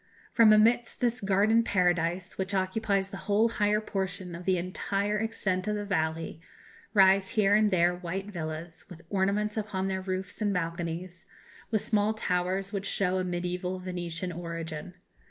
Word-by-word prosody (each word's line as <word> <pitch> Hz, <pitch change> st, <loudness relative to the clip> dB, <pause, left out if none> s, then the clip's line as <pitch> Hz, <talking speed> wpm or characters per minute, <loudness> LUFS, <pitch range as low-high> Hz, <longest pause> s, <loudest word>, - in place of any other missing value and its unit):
From 225 Hz, -2 st, +7 dB
amidst 230 Hz, +3 st, +4 dB
this 240 Hz, -1 st, 0 dB
garden 205 Hz, +3 st, +3 dB
paradise, 180 Hz, -2 st, +1 dB
which 190 Hz, +1 st, -2 dB
occupies 195 Hz, +1 st, 0 dB
the 195 Hz, -, -6 dB
whole 215 Hz, +3 st, +4 dB
higher 210 Hz, -1 st, +2 dB
portion 190 Hz, -3 st, -4 dB
of 170 Hz, +1 st, -8 dB
the 185 Hz, -1 st, +2 dB
entire 200 Hz, +3 st, -1 dB
extent 195 Hz, -4 st, -1 dB
of 210 Hz, -, 0 dB
the 205 Hz, 0 st, -3 dB
valley, 160 Hz, -3 st, -2 dB, 0.5 s
rise 195 Hz, -1 st, +5 dB
here 200 Hz, -1 st, +4 dB
and 210 Hz, 0 st, +5 dB
there 175 Hz, -2 st, +3 dB
white 180 Hz, +2 st, -4 dB
villas, 165 Hz, -1 st, -6 dB
with 170 Hz, -2 st, -11 dB
ornaments 205 Hz, +2 st, +1 dB
upon 195 Hz, -3 st, -2 dB
their 190 Hz, 0 st, -2 dB
roofs 185 Hz, +1 st, -4 dB
and 205 Hz, -1 st, +2 dB
balconies, 175 Hz, +1 st, -4 dB, 0.4 s
with 215 Hz, -3 st, +1 dB
small 215 Hz, 0 st, +1 dB
towers, 190 Hz, 0 st, -1 dB
which 195 Hz, -1 st, -2 dB
show 185 Hz, -1 st, 0 dB
a -, -, 0 dB
mediæval 180 Hz, +1 st, -3 dB
Venetian 180 Hz, -1 st, -4 dB
origin. 165 Hz, 0 st, -6 dB
190 Hz, 155 wpm, -29 LUFS, 175-205 Hz, 0.5 s, From